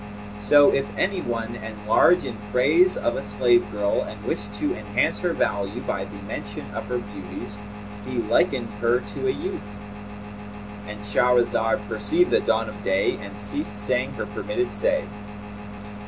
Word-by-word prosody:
So 145 Hz, +8 st, +6 dB
if 135 Hz, -, +1 dB
any 190 Hz, -1 st, +1 dB
one 115 Hz, -2 st, -3 dB
enlarge 110 Hz, +11 st, +3 dB
in 115 Hz, -, -4 dB, 0.2 s
praise 160 Hz, -, +4 dB
of 120 Hz, -, 0 dB
a -, -, -2 dB
slave 105 Hz, +2 st, +2 dB
girl 105 Hz, 0 st, +1 dB
and 105 Hz, 0 st, -7 dB
wish 105 Hz, -, -2 dB
to -, -, 0 dB
enhance 105 Hz, -1 st, 0 dB
her 180 Hz, -, 0 dB
value 100 Hz, -5 st, -1 dB
by 95 Hz, 0 st, -2 dB
the 100 Hz, +1 st, -10 dB
mention 105 Hz, 0 st, -6 dB
of -, -, -5 dB
her 125 Hz, -, -1 dB
beauties, 105 Hz, -1 st, -7 dB, 0.5 s
he -, -, -4 dB
likeneth -, -, +1 dB
her 120 Hz, +3 st, +2 dB
to 105 Hz, -, -4 dB
a -, -, +4 dB
youth,'" 190 Hz, -, -4 dB, 1.3 s
—And 105 Hz, 0 st, -7 dB
Shahrazad 115 Hz, 0 st, +2 dB
perceived 110 Hz, +11 st, +1 dB
the -, -, +5 dB
dawn 115 Hz, 0 st, +1 dB
of 105 Hz, -1 st, -8 dB
day 95 Hz, 0 st, +2 dB
and 100 Hz, 0 st, -8 dB
ceased 105 Hz, 0 st, -1 dB
saying 105 Hz, 0 st, 0 dB
her -, -, -4 dB
permitted -, -, -2 dB
say. -, -, +2 dB
105 Hz, 155 wpm, -24 LUFS, 105-120 Hz, 1.3 s, So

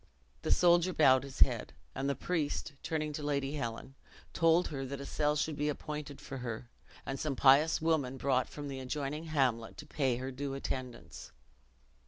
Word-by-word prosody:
The -, -, -3 dB
soldier 175 Hz, +1 st, +4 dB
bowed 130 Hz, -5 st, +5 dB
his 140 Hz, -1 st, -9 dB
head; -, -, +3 dB, 0.2 s
and 135 Hz, +1 st, -2 dB
the 140 Hz, -, 0 dB
priest, 155 Hz, -3 st, -2 dB
turning 155 Hz, -1 st, -2 dB
to 150 Hz, -, -4 dB
Lady 140 Hz, -1 st, -1 dB
Helen, 125 Hz, -2 st, -4 dB, 0.4 s
told 165 Hz, +1 st, +3 dB
her 135 Hz, -3 st, -4 dB
that 135 Hz, +1 st, -5 dB
a 140 Hz, -, -6 dB
cell 150 Hz, +1 st, +1 dB
should 150 Hz, +1 st, -1 dB
be 150 Hz, +1 st, 0 dB
appointed 150 Hz, -1 st, -5 dB
for 135 Hz, -, -7 dB
her, 120 Hz, -1 st, -6 dB, 0.3 s
and 135 Hz, 0 st, -4 dB
some 150 Hz, -3 st, -1 dB
pious 140 Hz, +5 st, +5 dB
woman 145 Hz, -5 st, +1 dB
brought 130 Hz, -1 st, +1 dB
from 145 Hz, -1 st, -7 dB
the 135 Hz, -1 st, -5 dB
adjoining 145 Hz, +4 st, -3 dB
hamlet 130 Hz, -8 st, 0 dB
to 150 Hz, -, -8 dB
pay 135 Hz, -4 st, 0 dB
her 130 Hz, +1 st, -4 dB
due 135 Hz, +1 st, -4 dB
attendance. 130 Hz, -3 st, -6 dB
140 Hz, 180 wpm, -32 LUFS, 130-150 Hz, 0.4 s, bowed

